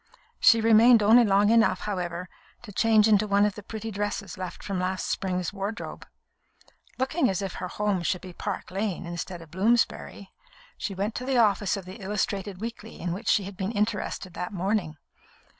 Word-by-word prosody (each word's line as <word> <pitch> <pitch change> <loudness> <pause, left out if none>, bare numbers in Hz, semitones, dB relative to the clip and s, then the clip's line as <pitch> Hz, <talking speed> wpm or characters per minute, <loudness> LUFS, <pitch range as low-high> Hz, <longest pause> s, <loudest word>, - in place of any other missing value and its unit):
She 230 -1 +6
remained 225 +1 +6
only 230 +4 +7
long 205 0 +4
enough, 230 -1 +3
however, 180 -3 -3 0.4
to 220 - -9
change 220 +1 +4
into 210 -1 +4
one 200 0 +4
of 210 - 0
the 210 - -9
pretty 220 +2 -6
dresses 205 0 -3
left 185 -1 -7
from 195 -3 -3
last 185 +1 -2
spring's 180 -2 -2
wardrobe. 205 +2 -5 0.9
Looking 265 +1 +1
as 190 +1 -1
if 195 - -4
her 180 - -2
home 205 0 -1
should 175 +1 -1
be 185 -1 -10
Park 200 +1 -5
Lane 195 -2 -2
instead 170 0 -6
of 155 - -18
Bloomsbury, 200 0 0 0.4
she 195 - -4
went 200 +4 -2
to 250 - -5
the 260 0 0
office 205 -3 +3
of 195 - -7
the 190 +4 -10
illustrated 195 -1 -2
weekly 225 0 -7
in 175 0 -2
which 205 +5 -7
she 205 - +3
had 195 +1 -8
been 190 +3 -3
interested 205 -3 -2
that 180 0 -5
morning. 190 -4 -1
200 Hz, 185 wpm, -26 LUFS, 185-220 Hz, 0.9 s, only